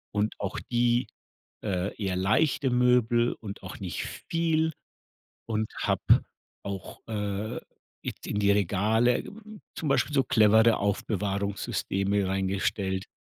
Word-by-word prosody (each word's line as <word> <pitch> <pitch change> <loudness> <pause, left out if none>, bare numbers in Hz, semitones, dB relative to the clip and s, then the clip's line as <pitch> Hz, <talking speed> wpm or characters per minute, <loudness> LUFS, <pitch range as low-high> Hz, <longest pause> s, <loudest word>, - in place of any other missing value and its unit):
und 105 +1 0
auch 100 - -3
die, 120 +1 +2 0.6
äh, 95 -1 -1
eher 95 -2 -1
leichte 130 - +2
Möbel 125 -1 +3
und 100 -3 -9
auch - - -8
nicht - - -4
viel 160 -1 0 0.8
und 110 -1 -1
habe - - 0 0.6
auch, 95 -2 -6
äh, 105 -1 -3 0.4
it - - -6
in 105 - -2
die 100 -1 +3
Regale 105 +5 +2 0.5
zum 155 - -3
Beispiel 140 +2 +2
so 135 - +5
clevere 110 0 +5
Aufbewahrungssysteme 100 -1 -1
reingestellt. 95 0 -1
105 Hz, 115 wpm, -28 LUFS, 100-120 Hz, 0.8 s, so